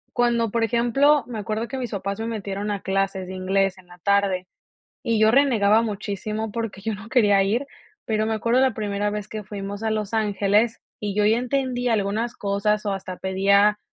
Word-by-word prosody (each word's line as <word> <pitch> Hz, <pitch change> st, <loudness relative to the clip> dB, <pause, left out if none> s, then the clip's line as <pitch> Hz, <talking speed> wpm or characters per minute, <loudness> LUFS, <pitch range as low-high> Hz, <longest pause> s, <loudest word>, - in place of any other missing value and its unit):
cuando, 235 Hz, -3 st, +2 dB
por 230 Hz, +1 st, +1 dB
ejemplo 245 Hz, +5 st, +3 dB
me 225 Hz, -3 st, -5 dB
acuerdo 220 Hz, +2 st, -3 dB
que 265 Hz, -, -5 dB
mis 245 Hz, -3 st, -3 dB
papás 200 Hz, +1 st, -3 dB
me 225 Hz, -, -3 dB
metieron 205 Hz, -2 st, -4 dB
a 200 Hz, -2 st, -2 dB
clases 190 Hz, -1 st, -1 dB
de 185 Hz, -, -7 dB
inglés 190 Hz, +1 st, 0 dB
en 180 Hz, -, -19 dB
la 175 Hz, -, -15 dB
tarde 200 Hz, -1 st, +1 dB, 0.5 s
y 230 Hz, -3 st, 0 dB
yo 220 Hz, 0 st, +5 dB
renegaba 230 Hz, -6 st, +4 dB
muchísimo 215 Hz, 0 st, -3 dB
porque 225 Hz, -3 st, -4 dB
yo 220 Hz, +2 st, -2 dB
no 210 Hz, +3 st, -9 dB
quería 205 Hz, -6 st, +4 dB
ir, 225 Hz, +8 st, 0 dB, 0.4 s
pero 215 Hz, -1 st, 0 dB
me 225 Hz, -, 0 dB
acuerdo 235 Hz, +4 st, +2 dB
la 260 Hz, -3 st, +3 dB
primera 205 Hz, -1 st, -1 dB
vez 210 Hz, 0 st, -4 dB
que 215 Hz, -1 st, -6 dB
fuimos 200 Hz, +1 st, -6 dB
a 225 Hz, -, 0 dB
Los 215 Hz, 0 st, -2 dB
Ángeles 210 Hz, +1 st, +1 dB, 0.2 s
y 205 Hz, -2 st, -3 dB
yo 210 Hz, 0 st, +3 dB
ya 220 Hz, +2 st, +4 dB
entendía 250 Hz, -1 st, 0 dB
algunas 220 Hz, +3 st, -1 dB
cosas 210 Hz, +1 st, 0 dB
o 200 Hz, -, 0 dB
hasta 185 Hz, -1 st, -6 dB
pedía, 200 Hz, +3 st, +3 dB
210 Hz, 200 wpm, -23 LUFS, 200-230 Hz, 0.5 s, yo